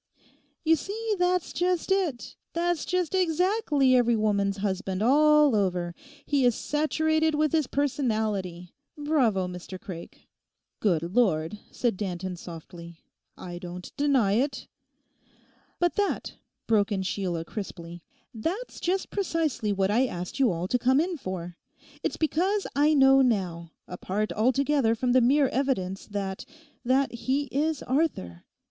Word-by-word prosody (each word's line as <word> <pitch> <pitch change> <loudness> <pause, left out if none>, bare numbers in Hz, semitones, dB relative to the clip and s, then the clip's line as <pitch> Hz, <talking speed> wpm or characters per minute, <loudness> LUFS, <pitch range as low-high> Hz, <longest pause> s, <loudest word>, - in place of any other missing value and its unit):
'You 325 +1 +5
see, 425 +7 -3
that's 360 -1 +1
just 360 +1 0
it! 355 -11 -1 0.2
That's 345 -1 0
just 365 -2 -1
exactly 355 - +2
every 240 -1 +4
woman's 200 -2 +1
husband 195 0 -2
all 300 +1 +5
over; 180 -4 0 0.3
he 285 -3 +1
is 245 -2 +4
saturated 315 +1 +1
with 305 -1 +1
his 310 -4 +1
personality. 215 -11 -1 0.2
Bravo, 255 -11 +1
Mr 180 +1 -8
Craik!' 175 -2 -10 0.5
'Good 175 -7 +1
Lord,' 185 -5 +1
said 235 -6 -1
Danton 185 -2 -4
softly. 170 0 -10 0.4
'I 175 -1 -7
don't 180 0 -8
deny 270 -8 +2
it!' 265 +5 0 1.1
'But 350 -1 +1
that,' 410 -1 -1 0.3
broke 215 -1 +2
in 190 -2 -1
Sheila 180 -3 -2
crisply—'that's 210 - -7
just 375 +2 -1
precisely 320 - -1
what 195 0 +1
I 250 +5 +3
asked 180 0 -6
you 255 -6 +4
all 170 +1 -3
to 250 - +1
come 260 +3 +3
in 350 +3 0
for. 180 - -6 0.4
It's - - -2
because 370 +6 0
I 300 +2 +4
know 270 -1 +6
now, 185 -9 0 0.2
apart 195 +4 -3
altogether 260 +1 +2
from 245 +2 0
the 255 +1 +5
mere 270 +3 +4
evidence, 195 -9 -1
that—that 255 +7 -3
he 260 +4 -1
is 300 +1 0
Arthur. 245 - -1
245 Hz, 130 wpm, -27 LUFS, 190-305 Hz, 1.1 s, know